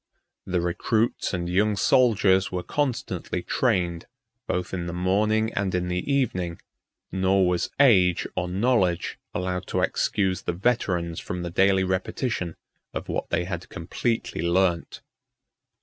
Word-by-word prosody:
The 90 Hz, -2 st, 0 dB
recruits 110 Hz, +7 st, 0 dB
and 85 Hz, -2 st, -2 dB
young 105 Hz, +4 st, +2 dB
soldiers 100 Hz, -4 st, +3 dB
were 90 Hz, -1 st, -3 dB
constantly 135 Hz, +4 st, -2 dB
trained, 85 Hz, -2 st, 0 dB, 0.4 s
both 90 Hz, 0 st, -2 dB
in 85 Hz, -2 st, -3 dB
the 85 Hz, -, -4 dB
morning 105 Hz, +5 st, +1 dB
and 95 Hz, -2 st, -1 dB
in 90 Hz, 0 st, -1 dB
the 90 Hz, +9 st, -2 dB
evening, 90 Hz, -11 st, 0 dB, 0.5 s
nor 95 Hz, 0 st, +3 dB
was 90 Hz, -1 st, 0 dB
age 95 Hz, -11 st, +5 dB
or 90 Hz, -, -1 dB
knowledge 95 Hz, -3 st, +1 dB, 0.2 s
allowed 90 Hz, 0 st, -2 dB
to -, -, 0 dB
excuse 95 Hz, -3 st, 0 dB
the -, -, -2 dB
veterans 90 Hz, -5 st, 0 dB
from 90 Hz, 0 st, -5 dB
the 85 Hz, -, -4 dB
daily 95 Hz, +1 st, +3 dB
repetition 95 Hz, 0 st, -2 dB, 0.4 s
of -, -, -5 dB
what -, -, -2 dB
they -, -, +1 dB
had 85 Hz, -1 st, -5 dB
completely 95 Hz, +3 st, -2 dB
learnt. 85 Hz, 0 st, +1 dB
95 Hz, 135 wpm, -25 LUFS, 90-105 Hz, 0.5 s, age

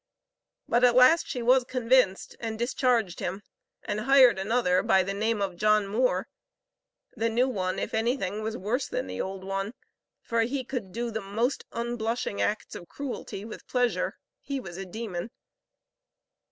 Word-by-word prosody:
But 240 Hz, +1 st, +2 dB
at 245 Hz, -1 st, +6 dB
last 255 Hz, +7 st, +6 dB
she 245 Hz, -, -3 dB
was 255 Hz, +2 st, +5 dB
convinced, 250 Hz, -5 st, +2 dB
and 225 Hz, -1 st, -4 dB
discharged 240 Hz, -5 st, +1 dB
him, 190 Hz, +3 st, -4 dB, 0.4 s
and 205 Hz, -, -2 dB
hired 255 Hz, -3 st, +6 dB
another 195 Hz, -3 st, +2 dB
by 190 Hz, -, +4 dB
the 195 Hz, +2 st, -3 dB
name 215 Hz, +1 st, 0 dB
of 185 Hz, -3 st, -3 dB
John 215 Hz, +1 st, +3 dB
Moore. 235 Hz, +6 st, +1 dB, 0.9 s
The 230 Hz, +1 st, 0 dB
new 240 Hz, +3 st, +2 dB
one, 185 Hz, -7 st, -2 dB
if -, -, -3 dB
anything, 220 Hz, -3 st, 0 dB
was 220 Hz, +1 st, -3 dB
worse 235 Hz, +8 st, -1 dB
than -, -, -3 dB
the 95 Hz, 0 st, -4 dB
old 190 Hz, 0 st, -5 dB
one, 195 Hz, +4 st, -3 dB, 0.4 s
for 230 Hz, 0 st, 0 dB
he 260 Hz, +4 st, -1 dB
could 245 Hz, -7 st, -5 dB
do 235 Hz, +3 st, -3 dB
the 220 Hz, 0 st, -3 dB
most 225 Hz, +7 st, -1 dB
unblushing 235 Hz, -2 st, -2 dB
acts 210 Hz, +1 st, -1 dB
of 175 Hz, -, -8 dB
cruelty 250 Hz, -6 st, -6 dB
with 220 Hz, -, -10 dB
pleasure. 245 Hz, -1 st, 0 dB, 0.2 s
He 275 Hz, -1 st, -4 dB
was 175 Hz, -8 st, -8 dB
a 190 Hz, +1 st, -6 dB
demon." 205 Hz, -1 st, -5 dB
225 Hz, 165 wpm, -27 LUFS, 195-245 Hz, 0.9 s, at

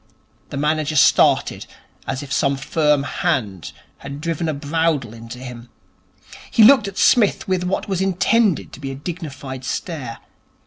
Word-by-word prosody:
The 140 Hz, -, -6 dB
manager 155 Hz, +1 st, 0 dB
started 135 Hz, -, +3 dB, 0.4 s
as 135 Hz, +1 st, -3 dB
if 140 Hz, 0 st, -6 dB
some 140 Hz, -2 st, +1 dB
firm 150 Hz, 0 st, +1 dB
hand 100 Hz, -, -2 dB, 0.3 s
had 140 Hz, +1 st, -8 dB
driven 165 Hz, 0 st, -2 dB
a -, -, -1 dB
bradawl 145 Hz, -4 st, -1 dB
into 115 Hz, +1 st, -10 dB
him. 125 Hz, -1 st, -9 dB, 0.8 s
He 225 Hz, -, +5 dB
looked 230 Hz, -2 st, +7 dB
at 195 Hz, -, -8 dB
Psmith 225 Hz, -6 st, +3 dB
with 185 Hz, -1 st, 0 dB
what 185 Hz, -, -2 dB
was 190 Hz, -2 st, -1 dB
intended 195 Hz, -, +1 dB
to -, -, -10 dB
be 140 Hz, -2 st, -5 dB
a 135 Hz, -, -5 dB
dignified 140 Hz, -4 st, -7 dB
stare. 130 Hz, -4 st, -4 dB
150 Hz, 150 wpm, -20 LUFS, 130-175 Hz, 0.8 s, looked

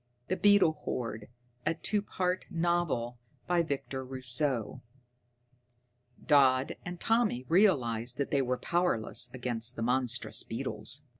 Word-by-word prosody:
_ -, -, -45 dB
The 185 Hz, -, +1 dB
Beetle 195 Hz, -7 st, +4 dB
Horde 115 Hz, -3 st, -4 dB, 0.3 s
A 165 Hz, -, 0 dB
TWO 205 Hz, +5 st, -1 dB
PART 185 Hz, -2 st, -2 dB
NOVEL 165 Hz, -9 st, -1 dB, 0.3 s
By 175 Hz, -1 st, +2 dB
Victor 140 Hz, -4 st, -4 dB
Rousseau 130 Hz, -1 st, 0 dB, 1.4 s
[Illustration: -, -, -21 dB
_Dodd 135 Hz, -3 st, +4 dB
and 175 Hz, 0 st, -7 dB
Tommy 225 Hz, -, +1 dB
realised 125 Hz, -, +2 dB
that 140 Hz, -, -2 dB
they 140 Hz, -, +2 dB
were 125 Hz, -1 st, -1 dB
powerless 175 Hz, -11 st, 0 dB
against 120 Hz, -2 st, -2 dB
the 115 Hz, -, -4 dB
monstrous 125 Hz, 0 st, +1 dB
beetles. 115 Hz, +2 st, -1 dB
135 Hz, 130 wpm, -30 LUFS, 120-175 Hz, 1.4 s, Beetle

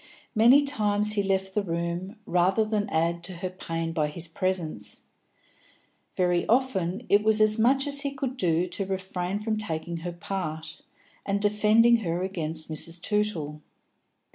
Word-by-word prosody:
Many 245 Hz, +6 st, +6 dB
times 210 Hz, -6 st, +1 dB
he 205 Hz, -, +1 dB
left 190 Hz, -1 st, -1 dB
the 210 Hz, -, +1 dB
room, 170 Hz, +2 st, -3 dB
rather 185 Hz, +5 st, +2 dB
than 215 Hz, -1 st, -1 dB
add 170 Hz, +1 st, 0 dB
to 185 Hz, -, -7 dB
her 185 Hz, +1 st, -4 dB
pain 165 Hz, -2 st, -4 dB
by 155 Hz, -2 st, +1 dB
his 165 Hz, +3 st, -3 dB
presence; 165 Hz, -, -3 dB, 1.1 s
very 180 Hz, -1 st, +2 dB
often 225 Hz, -4 st, 0 dB
it 205 Hz, -, +4 dB
was 220 Hz, 0 st, +4 dB
as 215 Hz, +1 st, +4 dB
much 265 Hz, +5 st, +3 dB
as 285 Hz, -1 st, +1 dB
he 280 Hz, -, -1 dB
could 265 Hz, -2 st, -4 dB
do 175 Hz, -7 st, +1 dB
to 190 Hz, +2 st, -3 dB
refrain 190 Hz, 0 st, -3 dB
from 215 Hz, +1 st, -2 dB
taking 170 Hz, -4 st, -4 dB
her 175 Hz, +2 st, -5 dB
part, 165 Hz, -3 st, -5 dB, 0.4 s
and 200 Hz, 0 st, -1 dB
defending 215 Hz, +3 st, +4 dB
her 175 Hz, -4 st, -2 dB
against 165 Hz, -4 st, -2 dB
Mrs. 165 Hz, +2 st, -1 dB
Tootle. 170 Hz, -7 st, -1 dB
190 Hz, 155 wpm, -26 LUFS, 170-215 Hz, 1.1 s, Many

